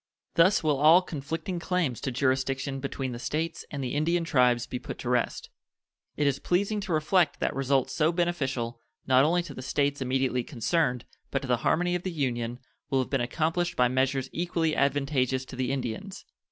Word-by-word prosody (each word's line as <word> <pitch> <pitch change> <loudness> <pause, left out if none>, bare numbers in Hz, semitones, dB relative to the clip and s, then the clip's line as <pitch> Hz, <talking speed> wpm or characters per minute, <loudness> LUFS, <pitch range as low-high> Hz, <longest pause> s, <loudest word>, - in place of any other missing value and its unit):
Thus 175 +3 +4
will 150 -3 +2
all 160 +5 +7
conflicting 165 +3 -4
claims 170 -9 -1
to 135 - -2
jurisdiction 135 +1 0
between 135 -1 -3
the 120 - -6
States 160 +6 -3
and 140 -2 -4
the 125 - -3
Indian 165 +4 +1
tribes 125 -6 +3
be 125 - -5
put - - -7
to 120 - -5
rest. 125 -1 -1 0.7
It 150 - +1
is 140 -1 +1
pleasing 200 +4 0
to 195 - -5
reflect 155 +1 +2
that - - -1
results 135 -1 +1
so 155 +3 +2
beneficial, 135 -9 -1 0.3
not 130 0 +5
only 175 +3 +2
to 160 -4 -8
the 130 - -7
States 140 +1 0
immediately 130 -1 0
concerned, 125 0 0 0.2
but 135 - -2
to - - -5
the 125 -1 +2
harmony 175 +8 +1
of 180 - -1
the 185 - -3
Union, 120 -6 -2 0.3
will 135 - +1
have 130 - -1
been 135 -3 +1
accomplished 165 +7 -1
by 125 -1 +3
measures 130 +1 +1
equally 165 -2 0
advantageous 135 -2 +1
to 130 - -9
the 125 0 -1
Indians. 135 - -4
140 Hz, 190 wpm, -28 LUFS, 130-165 Hz, 0.7 s, all